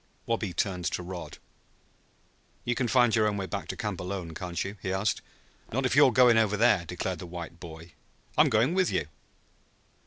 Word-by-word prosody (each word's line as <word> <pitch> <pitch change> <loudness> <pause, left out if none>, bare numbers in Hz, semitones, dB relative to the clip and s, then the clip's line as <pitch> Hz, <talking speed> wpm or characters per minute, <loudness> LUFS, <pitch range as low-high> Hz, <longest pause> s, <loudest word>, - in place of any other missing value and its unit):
Wabi 115 -4 -1
turned 90 +1 -2
to 90 - -1
Rod. 90 0 -7 1.3
"You 120 - +1
can 120 +1 -1
find 120 -1 +4
your 105 -1 +3
way 100 -2 -3
back 100 +1 -5
to - - -5
camp 105 -6 -3
alone, 90 -2 -5
can't 90 +1 -3
you?" 100 +2 -6
he 95 - -2
asked. 95 0 0 0.5
"Not 130 +4 0
if 130 - +1
you're 140 -2 +7
going 120 -1 +6
over 105 -2 +2
there!" 105 -5 +4
declared 90 +1 -3
the 90 - -7
white 85 -1 -8
boy. 80 0 -10 0.4
"I'm - - +5
going 115 +9 +3
with 185 -1 +2
you." - - -1
100 Hz, 185 wpm, -28 LUFS, 90-115 Hz, 1.3 s, you're